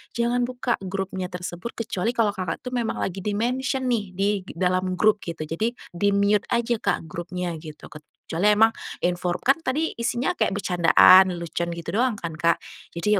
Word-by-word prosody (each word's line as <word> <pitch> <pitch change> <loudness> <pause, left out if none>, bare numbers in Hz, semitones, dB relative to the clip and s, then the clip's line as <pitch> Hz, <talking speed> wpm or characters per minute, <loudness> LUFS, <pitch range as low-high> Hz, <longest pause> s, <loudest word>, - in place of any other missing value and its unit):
jangan 240 +1 +1
buka 245 -1 -2
grupnya 190 -1 -4
tersebut 180 +4 -6
kecuali 230 0 -2
kalau 220 -3 +2
Kakak 185 -5 -4
itu 250 - -5
memang 240 -3 -1
lagi 190 0 -3
di-mention 250 +7 -1
nih 225 -4 0
di 195 +2 +1 0.2
g - - -10
dalam 185 +1 0
grup 215 +2 +3
gitu 165 -2 -5
jadi 215 +10 -2 0.2
di-mute 200 +3 +2
aja 235 -1 +1
Kak - - 0
grupnya 175 +1 -4
gitu 155 -1 -11
kecuali 165 +6 -1
emang 225 +2 +5 0.3
infor 175 0 0
kan 270 +5 +3
tadi 310 +3 -1
isinya 240 +2 0
kayak 195 - 0
bercandaan, 185 0 +6
lelucon 170 0 -3
gitu 170 -1 -6
doang 250 -2 +2
kan 170 -4 -5
Kak, 170 +1 +2 0.4
jadi 205 +4 +2
195 Hz, 170 wpm, -24 LUFS, 175-235 Hz, 0.4 s, bercandaan